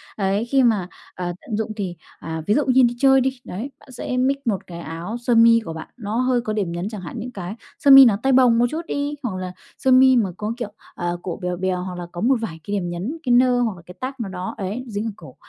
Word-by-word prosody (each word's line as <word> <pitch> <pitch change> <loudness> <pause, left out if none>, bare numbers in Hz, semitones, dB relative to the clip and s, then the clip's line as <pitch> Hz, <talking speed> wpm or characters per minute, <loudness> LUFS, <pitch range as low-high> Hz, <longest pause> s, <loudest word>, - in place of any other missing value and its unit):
Ấy, 200 +2 0
khi 265 +2 +3
mà, 210 -7 +2 0.3
ờ, 175 -1 -3
tận 215 - -4
dụng 220 0 -2
thì 190 -5 -4 0.2
à, 160 0 -5
ví 210 - +4
dụ 295 +4 +2
như 260 0 +5
đi 240 0 +2
chơi 270 0 +5
đi, 260 0 -1
đấy, 225 +10 -6
bạn 265 - -17
sẽ 250 0 -4
mix 260 +2 +2
một 210 -5 -1
cái 170 -1 -8
áo 170 +7 -5
sơ 240 0 0
mi 230 0 +7
của 165 - -5
bạn, 160 0 -8
nó 215 -2 -4
hơi 255 -1 +2
có 215 -2 -3
điểm 200 -5 -1
nhấn 175 +4 -3
chẳng 210 -3 -7
hạn, 175 - -8
những 250 +2 -6
cái 190 -1 -6 0.2
sơ 280 - +5
mi 270 0 +11
nó 215 -5 +4
tay 270 - +3
bồng 250 -3 +5
một 240 - +4
chút 320 +5 -3
đi, 285 +1 -2
hoặc 225 -7 -2
là 185 0 -4 0.3
sơ 265 - +1
mi 260 0 +7
mà 220 -6 +2
có, 215 +2 -3
kiểu, 240 -4 -4 0.3
ờ, 175 0 -2
cổ 180 - -5
bèo 180 -1 -2
bèo 185 0 -1
hoặc 180 -1 -6
là 175 - -5
có 175 - -6
một 265 +5 +4
vài 165 -8 -5
cái 205 +4 -3
điểm 180 -3 -2
nhấn, 190 - -4
cái 250 -4 +2
nơ 250 0 +4
hoặc 225 -5 0
là 175 - -13
cái 180 - -12
tag 260 +2 -3
nào 220 -4 -3
đó, 185 -1 -5
ấy, 205 +6 -4
dính 210 0 -3
ở 225 - -2
cổ, 150 -9 -13
220 Hz, 285 wpm, -22 LUFS, 180-250 Hz, 0.3 s, mi